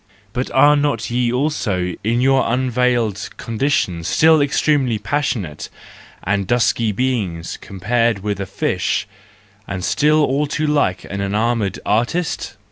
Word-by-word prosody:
But 125 Hz, +1 st, -2 dB
are 145 Hz, +2 st, +5 dB
not 145 Hz, -3 st, -1 dB
ye 120 Hz, 0 st, +1 dB
also 115 Hz, -, -1 dB
in 115 Hz, +3 st, +1 dB
your 135 Hz, -2 st, +3 dB
unveiled 120 Hz, -5 st, 0 dB
condition 115 Hz, -, -1 dB
still 160 Hz, -, +4 dB
extremely 140 Hz, -4 st, +1 dB
passionate 105 Hz, -, -3 dB, 0.5 s
and 100 Hz, 0 st, -1 dB
dusky 115 Hz, -2 st, +2 dB
beings 105 Hz, -8 st, -2 dB
compared 105 Hz, +2 st, 0 dB
with 105 Hz, -2 st, -2 dB
the 100 Hz, -, -4 dB
fish, -, -, -1 dB, 0.6 s
and 95 Hz, -2 st, -4 dB
still 150 Hz, +1 st, +3 dB
all 145 Hz, +2 st, +1 dB
too 155 Hz, +2 st, -2 dB
like 145 Hz, -12 st, +1 dB
an 100 Hz, 0 st, -5 dB
enamoured 105 Hz, +1 st, 0 dB
artist 120 Hz, +11 st, -1 dB
120 Hz, 125 wpm, -19 LUFS, 100-140 Hz, 0.6 s, are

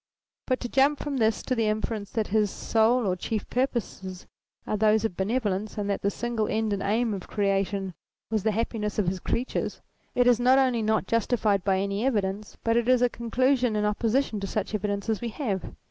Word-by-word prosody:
But 255 Hz, -1 st, +1 dB
to 245 Hz, -, -2 dB
jump 275 Hz, +4 st, +3 dB
from 285 Hz, -1 st, -3 dB
this 220 Hz, -2 st, +1 dB
to 255 Hz, -, -1 dB
the 225 Hz, -3 st, +1 dB
inference 215 Hz, -1 st, -2 dB
that 220 Hz, -3 st, -2 dB
his 210 Hz, 0 st, +2 dB
sole 225 Hz, +4 st, +2 dB
or 185 Hz, -2 st, +1 dB
chief 215 Hz, +4 st, -3 dB
purposes 215 Hz, -7 st, -2 dB, 0.4 s
are -, -, -1 dB
those 215 Hz, +1 st, +3 dB
of 190 Hz, -, -2 dB
benevolence, 210 Hz, 0 st, -1 dB
and 205 Hz, -1 st, -2 dB
that 200 Hz, -, -2 dB
the 200 Hz, -, +2 dB
single 235 Hz, 0 st, -2 dB
end 220 Hz, -1 st, 0 dB
and 200 Hz, -, -2 dB
aim 220 Hz, +3 st, +1 dB
of 190 Hz, -2 st, -6 dB
Creation 195 Hz, -2 st, 0 dB, 0.4 s
was 220 Hz, -2 st, +1 dB
the 220 Hz, -, +1 dB
happiness 210 Hz, -1 st, -2 dB
of 205 Hz, -4 st, +1 dB
his 185 Hz, +1 st, -1 dB
creatures, 245 Hz, +7 st, -2 dB, 0.4 s
is 245 Hz, -1 st, +4 dB
not 255 Hz, +2 st, +5 dB
only 255 Hz, -4 st, +3 dB
not 220 Hz, -1 st, +1 dB
justified 215 Hz, -3 st, +1 dB
by 195 Hz, -1 st, +2 dB
any 200 Hz, +2 st, -1 dB
evidence 210 Hz, -5 st, -1 dB
but 230 Hz, 0 st, +2 dB
is 245 Hz, +1 st, +3 dB
a 245 Hz, -, +4 dB
conclusion 245 Hz, +1 st, +1 dB
in 210 Hz, 0 st, +1 dB
opposition 220 Hz, +2 st, 0 dB
to 195 Hz, -, -4 dB
such 210 Hz, +1 st, -3 dB
evidence 205 Hz, 0 st, -2 dB
as 220 Hz, -2 st, 0 dB
we 240 Hz, -, -2 dB
have. 210 Hz, -, -3 dB
220 Hz, 200 wpm, -27 LUFS, 200-240 Hz, 0.4 s, not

